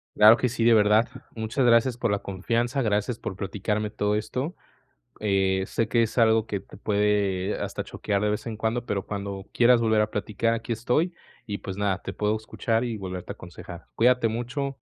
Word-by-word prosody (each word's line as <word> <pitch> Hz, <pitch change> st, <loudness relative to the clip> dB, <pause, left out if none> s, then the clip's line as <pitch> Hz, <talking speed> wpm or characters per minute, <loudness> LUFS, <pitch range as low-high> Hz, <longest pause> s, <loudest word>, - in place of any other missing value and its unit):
Claro 105 Hz, +2 st, +8 dB
que 125 Hz, -, 0 dB
sí, 115 Hz, -1 st, -2 dB
de 115 Hz, 0 st, +6 dB
verdad, 105 Hz, +1 st, +4 dB, 0.3 s
muchas 110 Hz, +4 st, -1 dB
gracias 120 Hz, +1 st, +4 dB
por 120 Hz, -2 st, -1 dB
la 100 Hz, -, +2 dB
confianza, 115 Hz, +8 st, -1 dB
gracias 110 Hz, +1 st, 0 dB
por 95 Hz, -, -5 dB
platicarme 105 Hz, +2 st, -2 dB
todo 105 Hz, 0 st, 0 dB
esto, 130 Hz, -, -3 dB, 0.6 s
eh, 95 Hz, -2 st, +1 dB
sé 115 Hz, +3 st, -1 dB
que 115 Hz, 0 st, +3 dB
es 115 Hz, -, -3 dB
algo 110 Hz, -1 st, +4 dB
que 100 Hz, -3 st, -3 dB
te -, -, -15 dB
puede 100 Hz, -2 st, +1 dB
hasta -, -, -3 dB
choquear 100 Hz, -1 st, -2 dB
de 105 Hz, -, +1 dB
vez 105 Hz, +3 st, -2 dB
en 115 Hz, -, -4 dB
cuando, 115 Hz, +3 st, -1 dB
pero 100 Hz, -2 st, -2 dB
cuando 100 Hz, -1 st, -5 dB
quieras 120 Hz, 0 st, +5 dB
volver 110 Hz, -2 st, +3 dB
a 105 Hz, -, -1 dB
platicar 105 Hz, +2 st, -1 dB
aquí 115 Hz, +1 st, -4 dB
estoy, 150 Hz, +10 st, 0 dB, 0.3 s
y, 100 Hz, -, -3 dB
pues, 95 Hz, 0 st, -6 dB
nada, 100 Hz, -1 st, -1 dB
te -, -, -5 dB
puedo 105 Hz, +1 st, 0 dB
escuchar 115 Hz, +1 st, -1 dB
y 115 Hz, -3 st, -3 dB
volverte 90 Hz, -2 st, -6 dB
a -, -, -4 dB
aconsejar. 85 Hz, -, -11 dB
Cuídate 125 Hz, 0 st, +4 dB
mucho. 130 Hz, +4 st, -3 dB
110 Hz, 195 wpm, -26 LUFS, 100-115 Hz, 0.6 s, Claro